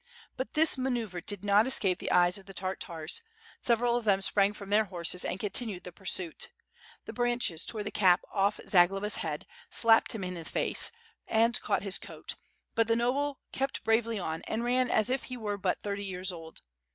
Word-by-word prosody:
But 260 - -5
this 310 -3 +3
manoeuvre 235 -8 -2
did 205 +2 -2
not 205 +3 +4
escape 195 -8 +2
the - - -4
eyes 180 +2 +4
of 195 - -17
the 195 - -11
Tartars. 180 - -4 0.4
Several 235 0 +2
of 240 - -1
them 200 -3 +3
sprang 200 0 +3
from 200 -1 -10
their 215 +1 +4
horses, 180 -1 -2
and 185 - -3
continued 205 -1 -1
the 180 - -8
pursuit. 180 -2 -1 0.6
The - - -7
branches 240 -9 0
tore 215 -2 -1
the 205 - -5
cap 185 -2 +4
off 200 +1 +1
Zagloba's 195 +3 +3
head, 150 -2 -3 0.2
slapped 225 -1 +4
him 220 -4 -4
in 180 0 -3
the 170 -2 -6
face, - - +2 0.4
and 230 +2 +2
caught - - 0
his 195 -2 0
coat, - - -7 0.4
but 230 -1 +2
the 230 - +3
noble 270 +4 0
kept 270 +1 -2
bravely 225 0 +2
on, 160 -4 -3
and 230 - -2
ran 250 +1 +2
as 220 +2 +2
if 265 - -1
he 255 - -6
were 205 -3 -3
but 185 -2 -1
thirty 200 0 -3
years 185 0 -1
old. 165 -2 -10
205 Hz, 195 wpm, -30 LUFS, 185-235 Hz, 0.6 s, not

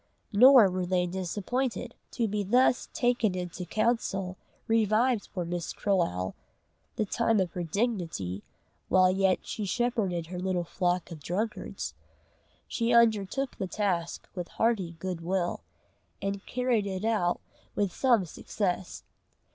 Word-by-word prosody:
Nor 250 0 +8
were 180 -1 -2
they 180 -1 +2
disappointed. 210 +8 -2 0.2
To 230 -3 0
be 210 0 -1
thus 245 +5 +3
taken 240 -5 +1
into 180 0 -5
counsel 195 -4 0 0.3
revived 225 +1 +2
for 180 -4 -3
Mistress 170 0 -4
Croale 130 - 0 0.6
the 215 - 0
time 225 +1 +1
of 185 -3 0
her 180 - -4
dignity 170 - -2 0.5
while 185 0 +5
yet 190 0 +2
she 215 - -4
shepherded 200 -5 0
her 180 +2 -6
little 180 -1 0
flock 180 0 -1
of 165 - -7
drunkards. 210 +9 -3 0.7
She 235 0 0
undertook 235 +2 +3
the 190 - -1
task 180 -4 -2
with 180 -2 -4
hearty 210 -7 0
good 180 0 -4
will, 175 0 -1 0.6
and 195 0 -3
carried 245 -5 +1
it 190 +1 -3
out 210 -6 +1 0.4
with 200 -4 0
some 240 -8 +3
success. 180 +2 -3
195 Hz, 130 wpm, -29 LUFS, 180-225 Hz, 0.7 s, Nor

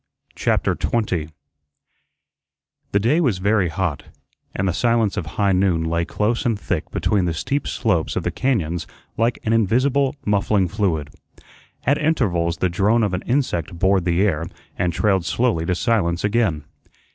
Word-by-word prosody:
CHAPTER - - +1
20 90 -9 -1 1.6
The 100 - +3
day 140 - +2
was 125 - +1
very 100 -1 +2
hot, 80 -3 -2 0.5
and 95 - 0
the 90 - +1
silence 115 0 +1
of 80 - -3
high 100 -1 +3
noon 90 -3 +2
lay 85 +1 0
close 110 +6 -1
and 115 -4 0
thick - - -3
between 100 -4 0
the 85 -2 -1
steep 140 - -2
slopes 90 -10 0
of - - -1
the - - -1
cañóns 90 -11 -1 0.3
like 115 +2 +1
an 110 - +1
invisible, 130 +6 +2
muffling 100 -2 +2
fluid. 85 -7 -1 0.7
At 140 +3 +2
intervals 85 - +1
the 90 - +1
drone 105 +6 +2
of 100 -3 0
an 90 - -1
insect 100 - -1
bored 95 0 +2
the 90 +2 +2
air 80 -4 -1 0.3
and 90 0 0
trailed 95 -1 +1
slowly 95 -4 0
to 90 - +1
silence 90 -6 0
again. 105 -8 +1
100 Hz, 160 wpm, -21 LUFS, 85-115 Hz, 1.6 s, The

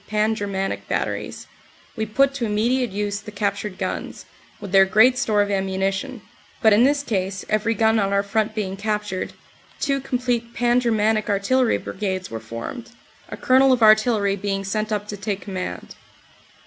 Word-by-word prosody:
Tan 215 +1 +1
Ger 205 -2 -4
manic" 195 -1 -3
Batteries, - - -3 0.5
we 220 -2 -2
put 275 +6 +2
to 265 -4 -2
immediate 235 +4 +1
use 205 +1 -3
the 210 - -10
captured 200 -1 -3
guns, 185 -1 -5 0.3
with 200 - -8
their 195 0 +7
great 220 +7 +5
store 215 -4 +2
of 205 - -4
ammunition, 195 +5 -2 0.4
but 220 -1 +5
in 225 +4 +5
this 285 +1 +2
case 190 -5 -2
every 215 +2 +1
gun 220 0 +3
on 195 -1 0
our 200 0 +2
front 215 +1 -1
being 195 -3 -3
captured, 210 -2 -3 0.5
two 275 -2 0
complete 245 -3 -2
"Pan 240 0 +3
Germanic" 220 -2 +1
Artillery 225 +5 +2
Brigades 190 -2 -4
were 115 - -4
formed, 115 - -7 0.4
a - - -7
Colonel 265 +1 +4
of 245 -3 +3
Artillery 215 -2 +4
being 195 0 -3
sent 215 +3 -2
up 210 -1 -2
to 205 - -6
take 200 -1 -3
command. 185 - -6
210 Hz, 170 wpm, -22 LUFS, 195-235 Hz, 0.5 s, their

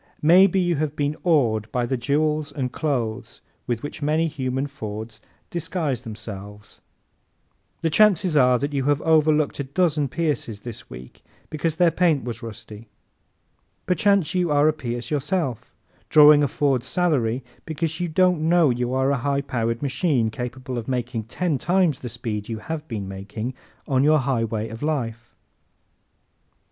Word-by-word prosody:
Maybe 185 +4 +6
you 175 -3 +1
have 150 0 -2
been 145 +1 -1
awed 115 - +2
by 125 -1 0
the 130 - -1
jewels 150 +4 0
and 130 -3 -3
clothes 125 -8 -3 0.3
with 120 -2 -2
which 145 - -7
many 155 +3 +1
human 130 -3 -2
Fords 110 -5 -7 0.3
disguise 165 -7 -2
themselves. 105 -3 -9 1.0
The 165 - 0
chances 190 -2 +4
are 125 -3 +5
that 140 +4 -3
you 135 -2 -1
have 145 0 +2
overlooked 155 -2 +3
a - - 0
dozen 150 0 +1
Pierces 140 -8 -2
this 120 -2 -9
week 65 0 -11 0.3
because 155 +1 -1
their 170 0 +4
paint 165 -4 +2
was 120 -2 -6
rusty. 110 -1 -10 1.0
Perchance 195 -3 +2
you 180 -2 +1
are 145 0 +4
a 155 - +3
Pierce 120 -4 -5
yourself, 145 - -2 0.4
drawing 150 -1 +8
a 145 - +3
Ford 135 -3 0
salary 135 -7 0 0.2
because 160 +1 -3
you 175 - -1
don't 180 0 +2
know 170 -5 +5
you 125 +1 -1
are 130 +1 +2
a 140 - +1
high 140 +3 0
powered 115 -2 -2
machine 135 -5 +1
capable 125 +1 -5
of 115 - -8
making 120 -3 -2
ten 155 +4 -1
times 175 -4 +2
the 125 - -6
speed 110 -3 -5
you 115 - -3
have 155 +7 -6
been 105 -5 -5
making 105 +5 -5 0.3
on 135 -2 +2
your 155 +1 +5
highway 115 -5 -1
of 115 +1 -9
life. 120 -6 -3
140 Hz, 155 wpm, -23 LUFS, 120-155 Hz, 1.0 s, drawing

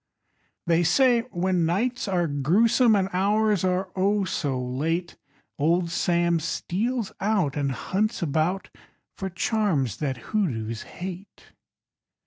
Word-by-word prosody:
_ - - -57 0.6
They 170 0 +3
say 235 +8 +4
when 180 -3 0
nights 235 +9 -1
are 180 -3 +1
grewsome 205 - +3
And 190 -2 +1
hours 205 +1 +2
are, 185 0 0
oh! 200 +2 +2
so 140 -7 -2
late, 155 +8 -2 0.4
Old 170 +3 +2
Sam 170 -1 +1
steals 210 +8 -2
out 195 -9 +1
And 140 -2 0
hunts 195 - -1
about 165 +5 -1 0.4
For 195 - -4
charms 175 - 0
that 135 -4 -2
hoodoos 115 - -2
hate! 185 +2 -9
180 Hz, 120 wpm, -25 LUFS, 155-205 Hz, 0.6 s, say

